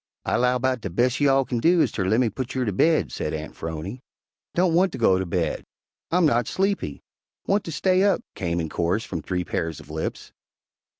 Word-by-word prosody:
"I -, -, +1 dB
'low 125 Hz, +1 st, +3 dB
'bout 130 Hz, -1 st, 0 dB
de 100 Hz, -, -4 dB
bes' 120 Hz, +8 st, +1 dB
you 145 Hz, -1 st, +4 dB
all 135 Hz, 0 st, +3 dB
kin 120 Hz, -2 st, -2 dB
do 170 Hz, +7 st, +4 dB
is -, -, +3 dB
ter 95 Hz, -, -2 dB
lemme 110 Hz, +4 st, +2 dB
putt 130 Hz, 0 st, -5 dB
you 130 Hz, -1 st, 0 dB
ter 105 Hz, -, 0 dB
baid," 155 Hz, -, +2 dB
said -, -, -3 dB
Aunt 80 Hz, 0 st, -7 dB
'Phrony. 80 Hz, +9 st, -6 dB, 0.5 s
"Don't 175 Hz, -1 st, +3 dB
want 185 Hz, +3 st, +3 dB
to -, -, -4 dB
go 95 Hz, -6 st, +4 dB
to 95 Hz, -, -2 dB
bed," 85 Hz, -2 st, -1 dB, 0.5 s
"I'm 175 Hz, 0 st, +3 dB
not 120 Hz, -6 st, +2 dB
sleepy," 195 Hz, +1 st, -1 dB, 0.4 s
"Want 200 Hz, +1 st, +1 dB
to 165 Hz, -, -5 dB
stay 185 Hz, +4 st, +2 dB
up," 200 Hz, -3 st, +2 dB
came 85 Hz, -3 st, -2 dB
in 80 Hz, -, -2 dB
chorus 85 Hz, +7 st, 0 dB
from 85 Hz, -4 st, -4 dB
three 90 Hz, +3 st, -2 dB
pairs 80 Hz, -2 st, -3 dB
of 75 Hz, -, -12 dB
lips. 80 Hz, 0 st, -4 dB
120 Hz, 220 wpm, -24 LUFS, -, 0.5 s, you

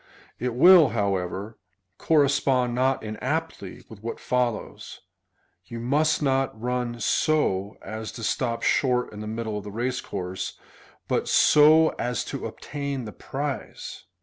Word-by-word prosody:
It 125 Hz, 0 st, -2 dB
will, 170 Hz, +1 st, +8 dB
however, 100 Hz, +1 st, -2 dB, 0.4 s
correspond 135 Hz, -5 st, +2 dB
not 130 Hz, +1 st, +1 dB
inaptly 125 Hz, -, -4 dB
with 110 Hz, -3 st, -13 dB
what 115 Hz, +1 st, -5 dB
follows: 125 Hz, -3 st, -3 dB, 0.3 s
" 90 Hz, +1 st, -44 dB
You 115 Hz, -, -6 dB
must 150 Hz, +6 st, +1 dB
not 135 Hz, -4 st, 0 dB
run 120 Hz, 0 st, -2 dB
so 105 Hz, -6 st, +1 dB
as 110 Hz, +2 st, -6 dB
to 115 Hz, -, -8 dB
stop 115 Hz, +1 st, -1 dB
sliort 125 Hz, -4 st, +1 dB
in 105 Hz, -, -8 dB
the 105 Hz, -, -6 dB
middle 110 Hz, -1 st, -3 dB
of -, -, -10 dB
the 105 Hz, -, -7 dB
race 125 Hz, +4 st, -2 dB
course, 95 Hz, -1 st, -5 dB, 0.5 s
but -, -, 0 dB
so 155 Hz, +2 st, +6 dB
as 125 Hz, +1 st, -1 dB
to -, -, -3 dB
obtain 140 Hz, -3 st, -5 dB
the 105 Hz, -, -7 dB
prize." 140 Hz, 0 st, -6 dB
125 Hz, 140 wpm, -25 LUFS, 110-140 Hz, 0.5 s, will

